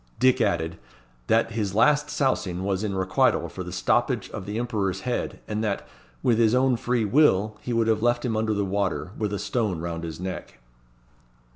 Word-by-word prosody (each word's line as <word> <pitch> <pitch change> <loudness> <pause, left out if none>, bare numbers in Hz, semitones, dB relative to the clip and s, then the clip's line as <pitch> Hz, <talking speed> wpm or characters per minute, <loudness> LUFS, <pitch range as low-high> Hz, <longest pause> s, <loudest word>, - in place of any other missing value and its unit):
Dick 130 -1 +4
added, 80 0 0 0.5
"that 115 0 +3
his 105 -3 -2
last 150 +5 +4
sousing 100 -11 0
was 95 0 -1
in 100 -2 -2
requital 95 0 +2
for - - -7
the - - -7
stoppage - - 0
of 95 - -7
the 105 +2 -3
Emperor's 110 -6 -1
Head, 125 -1 -3
and 105 +1 -2
that, 105 -2 -2 0.4
with 115 -2 +3
his 115 0 +4
own 130 0 +3
free 120 -1 0
will, 105 -4 +3
he 125 - -5
would 115 -1 +2
have 110 -1 +1
left 120 +1 +1
him 115 -3 0
under 110 0 0
the 100 0 0
water, 95 -2 -1
with 105 -2 -2
a 100 - -1
stone 105 -6 -1
round 85 0 -4
his 80 -1 -6
neck." 90 -6 -6
105 Hz, 190 wpm, -25 LUFS, 95-120 Hz, 0.5 s, Dick